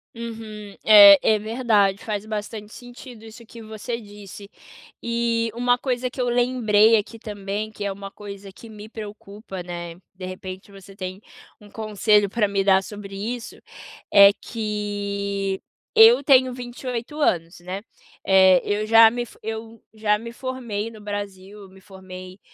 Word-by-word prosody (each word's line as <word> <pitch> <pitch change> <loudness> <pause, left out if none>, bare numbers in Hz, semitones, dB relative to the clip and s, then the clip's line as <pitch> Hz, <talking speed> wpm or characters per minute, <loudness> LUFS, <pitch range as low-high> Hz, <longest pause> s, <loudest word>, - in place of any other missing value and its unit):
Uhum, 220 -3 -8
é, 205 -2 +9
é 215 - +3
verdade, 215 -3 +1
faz 210 -1 -4
bastante 215 0 -6
sentido 245 -2 -12
isso 225 +1 -13
que 230 +1 -12
você 220 +2 -6
disse. 205 -1 -12 0.5
E 235 -1 -1
uma 245 +1 +1
coisa 250 -1 -2
que 260 - -12
eu 250 - 0
lembrei 230 -3 +3
aqui 225 +2 -5
também, 210 0 -5
que 205 -1 -6
é 200 - -1
uma 195 0 -8
coisa 200 -1 -10
que 225 +4 -14
me 215 0 -11
preocupa, 205 -3 -9
né, 175 -1 -7 0.2
de 185 0 -8
repente, 185 +1 -8
você 195 0 -14
tem 185 0 -7 0.4
um 205 - -15
conselho 210 -1 +1
pra 210 +1 0
me 195 -1 -1
dar 190 -1 +4
sobre 200 -1 -9
isso, 230 +4 -5 0.5
é 200 -1 +8
que 200 -3 -4 0.3
eu 235 +5 +7
tenho 260 -2 +4
28 245 +2 -6
anos, 170 - 0
né, 185 +3 -6 0.4
eh, 190 -2 +6
eu 210 +1 -2
já 225 0 +7
me 240 0 -3
for - - -18
eu 225 +1 -6
já 215 -1 +1
me 230 +2 -9
formei 235 -5 -5
no 220 -2 -13
Brasil, 205 -1 -7
me 190 0 -18
formei 185 -1 -11
210 Hz, 155 wpm, -23 LUFS, 200-230 Hz, 0.5 s, é